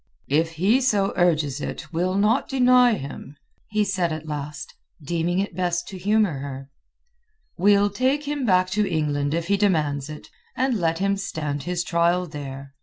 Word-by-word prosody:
"If 160 +3 +2
he 200 +11 +2
so 205 -7 +1
urges 155 -6 +1
it, - - -6
we'll 180 +3 0
not 210 +6 +2
deny 250 -2 +5
him," 140 -2 -8 0.3
he 210 0 +1
said 190 -4 0
at 155 0 -5
last, 150 -1 -6 0.3
deeming 170 +3 -1
it 195 -3 -2
best 175 -1 -1
to 190 - -7
humour 205 -6 +1
her. 135 0 -7 0.8
"We'll 205 +2 +4
take 265 +3 0
him 290 -1 -2
back 185 -4 +2
to 210 +1 +1
England 145 -2 0
if 170 0 -2
he 200 +3 +1
demands 155 -8 0
it, 150 -1 -9 0.3
and 260 +1 +1
let 165 -6 0
him 195 +2 0
stand 150 -7 -3
his 175 -1 -1
trial 170 +1 +1
there. 140 -3 -8
175 Hz, 170 wpm, -23 LUFS, 150-205 Hz, 0.8 s, deny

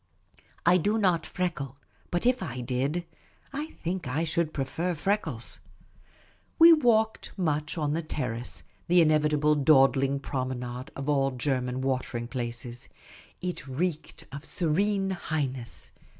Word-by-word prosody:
I 175 +2 +6
do 205 +6 +1
not 180 -6 +2
freckle, 145 -7 -3 0.3
but 175 +4 -1
if 250 -2 +3
I 130 -8 -4
did, 135 +8 -1 0.5
I 295 +3 -3 0.2
think 180 -3 -2
I 145 +6 0
should 165 0 0
prefer 160 +6 -2
freckles. 200 +7 -1 1.0
We 335 0 +10
walked 220 -7 +2
much 155 -3 -1
on 150 -2 0
the 165 - 0
terrace 125 -6 -3
— - - -36
the 180 +1 +5
inevitable 150 -1 +4
dawdling 135 -1 +4
promenade 130 -2 -4
of 135 +1 -5
all 135 -2 +3
German 130 0 -1
watering 130 -3 -2
places, 120 0 -5 0.3
— 80 0 -23
it 180 -5 -4
reeked 155 +4 -3
of 140 +2 -7
Serene 195 +5 +1
Highness. 140 -9 -2
150 Hz, 135 wpm, -28 LUFS, 130-175 Hz, 1.0 s, We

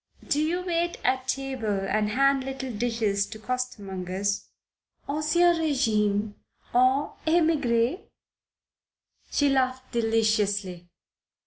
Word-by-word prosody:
Do 295 -1 +1
you 345 +4 0
wait 345 -1 -1
at 260 0 0
table 260 -8 -2
and 210 +1 +1
hand 275 +3 +3
little 265 -1 -5
dishes 215 -3 0
to 220 - -9
coster 250 -1 -3
mongers, 190 +1 -3 0.6
ancien 310 +4 +3
regime, 215 -9 +1 0.4
en 255 +3 +3 0.2
emigre?" 305 -4 +2 1.3
She 290 - +2
laughed 260 -1 0
deliciously. 210 -6 0
250 Hz, 100 wpm, -26 LUFS, 210-280 Hz, 1.3 s, hand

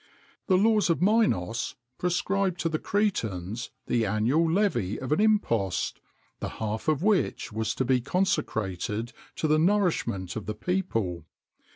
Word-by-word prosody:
The 185 - +4
laws 215 -1 +3
of 165 - +2
Minos 180 - +1 0.2
prescribed 185 +1 0
to 165 - +1
the 155 -1 -1
Cretans 115 - -1 0.2
the 120 -2 +1
annual 125 +11 +2
levy 175 - +1
of 130 - -5
an 155 - +3
impost, 115 - +1 0.4
the - - -3
half 110 +3 -3
of 155 +1 +1
which 205 - +1
was 110 0 -1
to 130 - 0
be 125 0 +2
consecrated 110 - -1 0.2
to 155 - -1
the 155 0 +3
nourishment 160 - +1
of 110 - -5
the 105 - -3
people. 110 - -2
145 Hz, 145 wpm, -27 LUFS, -, 0.4 s, The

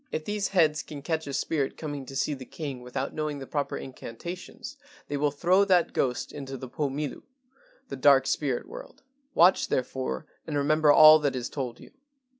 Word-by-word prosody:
If 155 - -3
these 210 -1 -1
heads 155 -5 +2
can 145 -2 -9
catch 160 -1 -2
a - - -4
spirit 140 -1 -1
coming 145 -4 -6
to 135 - -9
see 140 +2 0
the 130 -2 -7
king 140 -2 -6
without 125 +2 -4
knowing 155 -1 -3
the 135 - -7
proper 145 +1 -2
incantations, 175 - -8 0.3
they 145 - -2
will 145 +1 +2
throw 180 +7 +3
that 180 -3 +3
ghost 125 -2 -1
into 135 -2 -7
the 130 - -7
Po 145 +3 -2
Milu 145 +1 -4 0.7
[The - - -5
Dark 135 0 +5
Spirit 135 -3 -1
world]. - - -11 0.3
Watch 175 +3 +5
therefore 130 - -2 0.2
and 150 -2 -2
remember 150 +1 +4
all 155 +1 +9
that 145 -3 0
is 125 -2 -3
told 125 -4 -5
you. - - -14
145 Hz, 190 wpm, -27 LUFS, 135-155 Hz, 0.7 s, all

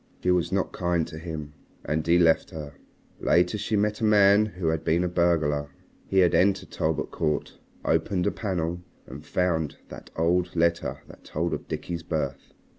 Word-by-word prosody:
She 90 - +3
was 90 -1 +1
not 95 0 0
kind 85 -2 0
to 80 - -9
him. 80 -3 -6 0.3
And 80 +1 -1
he 85 +1 +5
left 85 -2 +3
her. 75 -3 -7 0.5
Later 90 +3 +3
she 110 - -1
met 105 +2 0
a - - -2
man 105 0 +5
who 90 -5 -2
had 80 -1 -1
been 85 +3 +2
a - - +1
burglar. 80 -5 +1 0.4
He 95 - -1
had 90 -2 +5
entered 95 +1 +2
Talbot 80 -1 -1
Court, 75 -2 -2 0.3
opened 90 -3 +1
a - - +2
panel, 90 -4 -2 0.2
and 70 +4 -10
found 80 -5 -1
that - - -10
old 90 +2 +1
letter 85 0 0
that - - -15
told 85 +3 -2
of - - -5
Dickie's 85 -1 -4
birth. 80 -5 -4
85 Hz, 180 wpm, -26 LUFS, 80-90 Hz, 0.5 s, he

